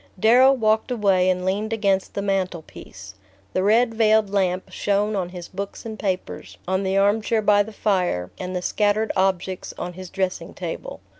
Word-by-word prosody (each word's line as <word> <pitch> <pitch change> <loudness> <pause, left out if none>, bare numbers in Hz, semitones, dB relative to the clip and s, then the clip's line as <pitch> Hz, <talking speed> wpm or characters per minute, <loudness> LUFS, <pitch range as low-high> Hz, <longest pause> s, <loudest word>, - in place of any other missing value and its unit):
Darrow 245 +6 +6
walked 220 -2 +1
away 195 -6 +2
and 180 0 0
leaned 205 +4 -1
against 200 -4 0
the 200 - -2
mantelpiece. 175 - -4 0.4
The 185 - +1
red 225 +4 +3
veiled 220 -2 +3
lamp 185 -2 0
shone 205 +1 0
on 185 -3 -2
his 180 -1 -8
books 200 +3 -7
and 220 -1 -7
papers, 190 -3 -4
on 190 +1 0
the 190 0 0
arm 205 +3 +3
chair 220 0 0
by 205 0 +5
the 210 +2 -4
fire, 180 - -1
and 185 0 -5
the 180 - -3
scattered 210 +2 +1
objects 190 -1 -1
on 180 0 -5
his 185 0 -9
dressing 190 -2 -3
table. - - -6
195 Hz, 175 wpm, -23 LUFS, 185-215 Hz, 0.4 s, Darrow